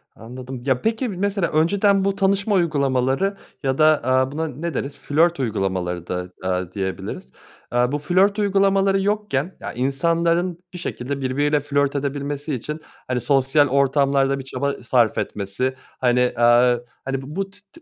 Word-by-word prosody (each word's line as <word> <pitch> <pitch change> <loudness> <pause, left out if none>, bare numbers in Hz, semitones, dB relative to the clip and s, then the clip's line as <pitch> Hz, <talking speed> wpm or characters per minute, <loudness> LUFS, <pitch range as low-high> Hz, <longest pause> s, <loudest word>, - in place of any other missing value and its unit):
Anladım. 125 +2 -8
Ya, 130 -2 +1
peki, 230 +3 0
mesela 200 -1 -1
önceden 195 +5 +3
bu 195 - +1
tanışma 200 +1 +1
uygulamaları 145 +3 +1 0.3
ya 135 -1 0
da, 155 - +5 0.2
aaa, 130 +1 +2
buna 160 +2 -2
ne 160 +4 -5
deriz? 140 +2 -4
Flört 160 +4 +2
uygulamaları 95 -7 -2
da, 90 0 -3
aaa, 90 -1 -1
diyebiliriz. 95 -9 -5 0.4
Aaa, 120 +1 +2
bu 145 - -1
flört 190 +7 +2
uygulamaları 195 -1 +3
yokken 195 -6 -1
ya, - - -6
insanların 170 +7 0
bir - - -6
şekilde 140 -5 -4
birbiriyle 145 +3 +1
flört 140 0 0
edebilmesi 145 +1 -3
için, 150 +6 -6 0.3
hani, 125 -1 -1
sosyal 140 +2 +3
ortamlarda 140 0 +2
bir 135 - -6
çaba 135 0 -3
sarf 120 -2 +2
etmesi, 105 +6 -2 0.2
hani, 125 0 +2
aaa, 120 +1 +5 0.3
hani, 135 0 -2 0.2
bu 195 0 -2
tı 200 - -17
tı 335 - -16
140 Hz, 150 wpm, -22 LUFS, 125-175 Hz, 0.4 s, da